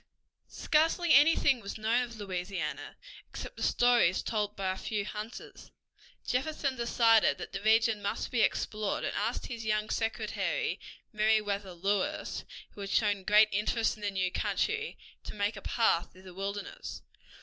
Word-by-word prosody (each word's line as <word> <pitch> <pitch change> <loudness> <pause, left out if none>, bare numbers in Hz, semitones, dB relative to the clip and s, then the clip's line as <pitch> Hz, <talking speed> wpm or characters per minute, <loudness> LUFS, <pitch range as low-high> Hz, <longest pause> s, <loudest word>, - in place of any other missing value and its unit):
Scarcely 325 +2 +2
anything 285 -2 +5
was 200 +1 -6
known 225 +3 +1
of 240 -2 -5
Louisiana, 180 -5 -4 0.3
except - - -8
the - - -10
stories 240 -7 +3
told 210 -2 -2
by 190 -1 -1
a - - -3
few 205 -1 -3
hunters. 215 +3 -8 0.6
Jefferson 275 +1 -1
decided 230 -2 +3
that - - -7
the 195 - -5
region 220 0 +3
must 200 - -3
be 240 -3 +2
explored, 215 -2 0
and - - -2
asked - - -2
his 235 -2 -6
young 215 0 0
secretary, 225 -1 -1 0.3
Meriwether 210 -3 +1
Lewis, 205 - -2 0.3
who 205 - -11
had 200 - -5
shown 205 -1 +2
great 210 +2 +6
interest 215 +3 +1
in 215 - -16
the 205 - -1
new 185 -2 -1
country, 440 - -1 0.3
to - - -8
make 205 +1 -1
a 200 - -8
path 210 -7 +1
through 185 - -17
the 185 -1 -11
wilderness. 200 - -6
215 Hz, 155 wpm, -30 LUFS, 200-235 Hz, 0.6 s, great